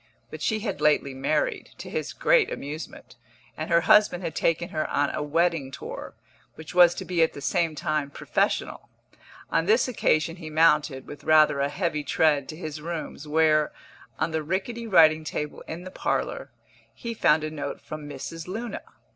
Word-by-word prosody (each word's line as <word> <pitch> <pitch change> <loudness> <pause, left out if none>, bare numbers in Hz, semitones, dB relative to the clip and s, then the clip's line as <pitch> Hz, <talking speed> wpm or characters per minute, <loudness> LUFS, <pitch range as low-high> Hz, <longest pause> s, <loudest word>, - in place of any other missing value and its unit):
But - - -8
she 215 -1 0
had 215 - -4
lately 150 -2 +2
married, 140 +3 -1
to - - -9
his - - -3
great - - +3
amusement, 150 +3 -7 0.4
and 155 - -5
her 170 0 +4
husband 190 -1 +4
had 160 - -3
taken 165 +1 0
her 155 -1 -2
on 145 0 +1
a - - -3
wedding 160 -1 +1
tour, 135 - -8 0.4
which 160 0 -10
was 175 -1 +6
to - - -6
be 180 -2 0
at 160 - +3
the - - -8
same 165 +2 0
time 150 -1 -1
professional. - - -2 0.6
On 165 +1 +1
this 225 +5 +4
occasion 165 -8 +1
he 160 -3 -8
mounted, 150 -4 +3
with 145 - -10
rather 155 -2 +5
a 140 +1 +1
heavy 160 -2 -2
tread, 145 -1 +2
to 155 - -6
his 155 -3 -6
rooms, 160 -2 -6
where 155 0 +3 0.5
(on - - -1
the 160 0 -1
rickety 195 +9 -3
writing 160 -5 +5
table 150 -1 -4
in 170 +2 -6
the 185 - -8
parlour) - - -2 0.5
he 235 -1 -5
found 155 -8 +3
a 155 - -3
note 150 -2 -5
from 155 -1 -8
Mrs. 160 +4 -7
Luna. 225 +5 -5
160 Hz, 180 wpm, -26 LUFS, 150-175 Hz, 0.6 s, was